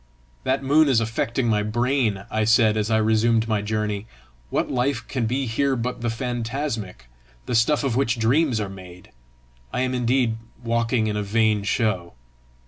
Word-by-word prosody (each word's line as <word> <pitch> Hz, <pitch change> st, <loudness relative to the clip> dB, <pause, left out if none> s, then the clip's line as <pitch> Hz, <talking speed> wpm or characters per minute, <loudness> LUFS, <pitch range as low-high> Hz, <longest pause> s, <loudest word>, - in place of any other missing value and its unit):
"That 135 Hz, +1 st, 0 dB
moon 145 Hz, +2 st, +4 dB
is 125 Hz, -4 st, +4 dB
affecting 115 Hz, +2 st, -1 dB
my 105 Hz, -2 st, +2 dB
brain," 110 Hz, -2 st, 0 dB
I 110 Hz, 0 st, +1 dB
said 110 Hz, 0 st, +4 dB
as 105 Hz, 0 st, -1 dB
I 110 Hz, -, +3 dB
resumed 110 Hz, +1 st, +2 dB
my 110 Hz, -2 st, 0 dB
journey. 105 Hz, 0 st, -2 dB, 0.4 s
"What -, -, -1 dB
life 125 Hz, -1 st, -1 dB
can 125 Hz, -4 st, -1 dB
be 130 Hz, +4 st, -1 dB
here 135 Hz, +4 st, 0 dB
but 125 Hz, 0 st, -3 dB
the 120 Hz, -, -1 dB
phantasmic 115 Hz, -, -4 dB, 0.4 s
the -, -, -3 dB
stuff 120 Hz, +7 st, +3 dB
of 130 Hz, -4 st, 0 dB
which 125 Hz, -2 st, +1 dB
dreams 125 Hz, +2 st, +2 dB
are 105 Hz, -, -2 dB
made? 90 Hz, -2 st, -12 dB, 0.6 s
I -, -, -1 dB
am 130 Hz, 0 st, 0 dB
indeed 125 Hz, -2 st, +1 dB, 0.3 s
walking 115 Hz, 0 st, +1 dB
in 105 Hz, -1 st, -1 dB
a -, -, 0 dB
vain 105 Hz, 0 st, +2 dB
show!" 100 Hz, -4 st, -1 dB
115 Hz, 170 wpm, -23 LUFS, 110-125 Hz, 0.6 s, moon